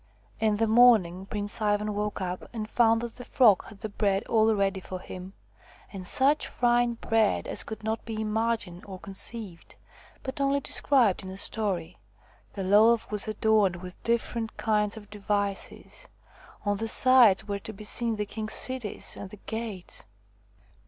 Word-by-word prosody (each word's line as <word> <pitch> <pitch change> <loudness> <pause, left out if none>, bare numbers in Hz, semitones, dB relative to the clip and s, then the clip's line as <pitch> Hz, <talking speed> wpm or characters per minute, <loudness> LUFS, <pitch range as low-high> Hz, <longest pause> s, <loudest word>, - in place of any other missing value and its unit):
' - - -32
In 210 - 0
the 225 - +2
morning 215 -6 +4
Prince 205 +2 -3
Ivan 210 0 +1
woke 210 -1 -3
up 180 0 -5
and 215 -2 -4
found 225 0 +3
that 235 -1 -7
the 245 - -8
Frog 230 -6 +4
had 200 - -14
the 215 - -4
bread 200 -1 0
all 220 -1 +3
ready 195 -1 0
for 185 0 -7
him, 185 +1 -9 0.6
and 185 -2 -6
such 280 +7 +3
fine 240 -1 +1
bread 225 -2 +1
as - - -1
could 220 -1 -8
not 220 +1 -2
be 225 -1 -5
imagined 220 -4 -2
or 190 -2 -7
con 195 - -10
ceived, 195 -4 -5 0.5
but 275 +2 -5
only 275 0 +2
described 255 -7 +2
in 190 - -8
a 190 - -8
story. 190 -6 0 0.5
The 195 - -4
loaf 215 +5 +4
was 210 0 -1
adorned 215 -3 +2
with 180 0 -10
different 230 -1 -2
kinds 210 -1 0
of 205 -1 -12
devices: 205 -1 -4 0.6
on 205 0 +1
the 225 +2 -3
sides 235 -5 +5
were 200 -1 -3
to 220 - -7
be 215 0 -11
seen 230 +2 0
the 210 -1 -2
king's 215 +1 -4
cities 255 -5 -1
and 200 - -8
the 210 - -12
gates. 220 -5 -6
215 Hz, 170 wpm, -27 LUFS, 195-230 Hz, 0.6 s, sides